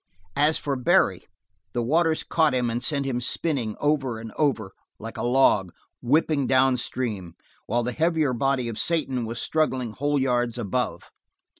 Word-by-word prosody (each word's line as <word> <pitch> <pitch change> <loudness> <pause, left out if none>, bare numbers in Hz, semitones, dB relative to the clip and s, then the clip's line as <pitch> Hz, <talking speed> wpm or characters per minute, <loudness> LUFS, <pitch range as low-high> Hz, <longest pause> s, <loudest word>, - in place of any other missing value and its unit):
As 150 +2 +3
for 140 -2 -2
Barry, 125 - +2 0.5
the 120 - -1
waters 160 +5 +2
caught 155 -5 +2
him 125 -2 0
and 120 +1 -2
sent 140 +1 0
him 125 -2 -2
spinning 125 -3 -2
over 140 -5 0
and 110 0 -8
over, 120 -10 0 0.3
like 115 +1 -8
a - - -5
log, 120 -7 +3 0.3
whipping 140 +1 +2
down 130 -1 +4
stream, 105 -9 -4 0.3
while 120 +2 0
the 125 - -2
heavier 160 -2 +1
body 130 0 0
of 115 -2 -5
Satan 135 -8 -1
was 115 +1 -5
struggling 130 -7 0
whole 145 +4 0
yards 120 -2 0
above. 120 +2 -3
130 Hz, 160 wpm, -25 LUFS, 120-145 Hz, 0.5 s, down